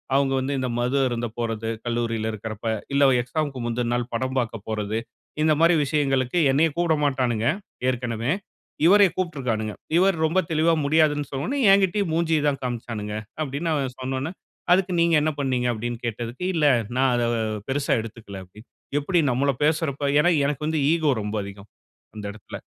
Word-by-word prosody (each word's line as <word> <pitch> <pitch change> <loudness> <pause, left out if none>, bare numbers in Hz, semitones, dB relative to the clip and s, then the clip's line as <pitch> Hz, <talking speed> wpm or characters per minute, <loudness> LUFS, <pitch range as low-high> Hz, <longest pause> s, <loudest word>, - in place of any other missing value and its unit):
அவங்க 135 -1 +2
வந்து 130 +2 -2
இந்த 130 - -1
மது 125 +3 0
அருந்த 120 -1 -2
போறது 115 -1 -2 0.2
கல்லூரியில 115 -2 -1
இருக்கிறப்ப, 110 +1 -6 0.3
இல்ல 140 0 +4 0.2
எக்ஸாம்க்கு 145 0 -3
முந்துன 120 0 -1
நாள் 120 0 -3
படம் 130 +2 -2
பார்க்க 115 -4 -4
போறது." 110 0 -2 0.5
இந்த 155 - +4
மாரி 170 +1 +5
விஷயங்களுக்கு 135 0 0
என்னையும் 150 +3 +2
கூப்பிட 170 -2 +2
மாட்டானுங்க, 125 -5 0 0.4
ஏற்கனவே. 120 0 -2 0.5
இவரையும் 195 0 +6
கூப்பிட்டுருக்கானுங்க. 125 - -2 0.2
இவர் 190 +1 +4
ரொம்ப 165 +4 +2
தெளிவா 160 +1 +3
முடியாதுன்னு 150 -1 +3
சொன்ன 135 -1 -4
உடனே, 280 - -2
"என்கிட்டேயும் 195 -1 +3
மூஞ்சிய 160 -2 +1
தான் 140 -2 0
காண்பிச்சானுங்க" 115 -4 -4 0.3
அப்படின்னு 150 +3 -2
அவன் 135 -4 -1
சொன்ன 130 +1 -3
உடனே, 140 +5 -3 0.4
"அதுக்கு 185 +1 +3
நீங்க 170 0 +3
என்ன 155 +1 +1
பண்ணினீங்க?" 130 -3 0
அப்படின்னு 120 +2 -4
கேட்டதுக்கு, 120 +5 -4
"இல்ல 155 -2 +3 0.3
நான் 130 0 +3
அதை 120 -1 +1 0.4
பெரிசா 140 +1 0
எடுத்துக்கல" 110 -3 -9
அப்படின்னு. 105 +6 -17 0.3
எப்படி 170 +5 +1
நம்மள 140 +3 +2
பேசுறப்ப? 150 -2 0
ஏன்னா 175 +4 +4 0.2
எனக்கு 150 +1 -2
வந்து 160 0 0
ஈகோ 160 -3 +2
ரொம்ப 105 +1 -4
அதிகம், 100 +1 -10 0.5
அந்த 105 -1 -7
இடத்துல. 105 -2 -9
135 Hz, 160 wpm, -24 LUFS, 115-155 Hz, 0.5 s, இவரையும்